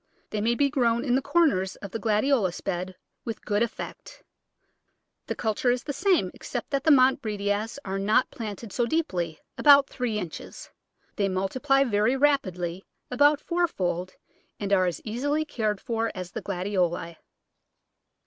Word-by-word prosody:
They 210 - -2
may 235 +3 +2
be 285 +3 +3
grown 235 -3 +1
in 245 - +1
the 265 - +3
corners 230 - +2
of 200 - -9
the 225 - -4
Gladiolus 215 -3 +1
bed 185 0 -3 0.3
with 225 -2 -6
good 205 0 +1
effect 235 - -5 1.0
The - - -2
culture 220 +2 0
is 245 +1 +1
the 285 - -4
same, 380 +5 +2
except - - -6
that 275 -1 0
the - - +5
Montbretias 220 -6 +2
are 195 0 -2
not 215 +6 +2
plant 220 -5 -6
ed 215 - -9
so 240 -1 +1
deeply 180 - -1
— - - -51
about 285 -2 +7
three 245 -4 -2
inches. 180 -6 -7 0.5
They 200 -1 +1
multiply 260 +9 +1
very 225 +1 +2
rapidly 185 -11 0 0.2
— - - -46
about 290 +3 +4
fourfold, 185 - -1 0.4
and 200 -1 -1
are 185 -2 +4
as 175 - -3
easily 285 +8 -1
cared 215 -8 -1
for 230 +1 -2
as 180 -2 -6
the - - -5
Gladioli. 180 -3 -2
220 Hz, 160 wpm, -26 LUFS, 190-270 Hz, 1.0 s, about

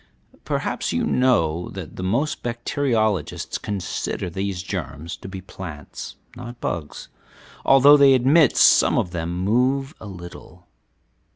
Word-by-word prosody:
Perhaps - - -2
you - - 0
know 90 -11 +1
that - - -8
most 120 +12 -1
bacteriologists 115 - -1
consider 95 -2 -4
these 95 0 -3
germs 80 -4 -5
to - - -10
be 95 -1 -7
plants, 90 -5 -9 0.2
not 120 0 -9
bugs, 80 -4 -5 0.6
although 140 +2 +7
they 140 -2 +6
admit 135 +3 +4
some - - +5
of 90 - 0
them 85 -2 -3
move 130 +9 +1
a 110 - -8
little. 90 -1 -11
100 Hz, 120 wpm, -22 LUFS, 90-130 Hz, 0.6 s, although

